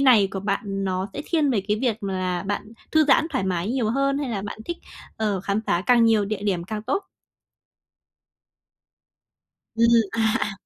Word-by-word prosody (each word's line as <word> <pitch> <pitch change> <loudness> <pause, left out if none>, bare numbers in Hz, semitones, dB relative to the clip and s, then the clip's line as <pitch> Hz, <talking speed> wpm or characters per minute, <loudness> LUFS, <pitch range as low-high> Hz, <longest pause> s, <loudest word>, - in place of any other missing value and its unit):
này 235 -8 +6
của 195 - -4
bạn 195 0 -2
nó 185 +1 -1
sẽ 290 - -5
thiên 310 -4 +2
về 220 -6 +2
cái 210 - +2
việc 230 -4 -1
là 185 -2 -2
bạn 205 +2 -4 0.2
thư 315 -1 +5
giãn 295 +3 +4
thoải 260 -9 -1
mái 185 +1 -1
nhiều 240 -4 0
hơn, 275 +2 +1
hay 280 -3 -2
là 200 -3 -3
bạn 205 - -6
thích, 345 - -4 0.4
ờ, 210 -4 0
khám 200 +2 -1
phá 175 - +2
càng 240 -2 +5
nhiều 220 -2 +4
địa 205 0 -4
điểm 185 -4 -1
càng 210 +2 -5
tốt? 275 - -1 2.7
Ừm, 230 +1 +4 0.3
à, 230 - -3 0.2
à. 210 - -1
210 Hz, 185 wpm, -24 LUFS, 195-255 Hz, 2.7 s, này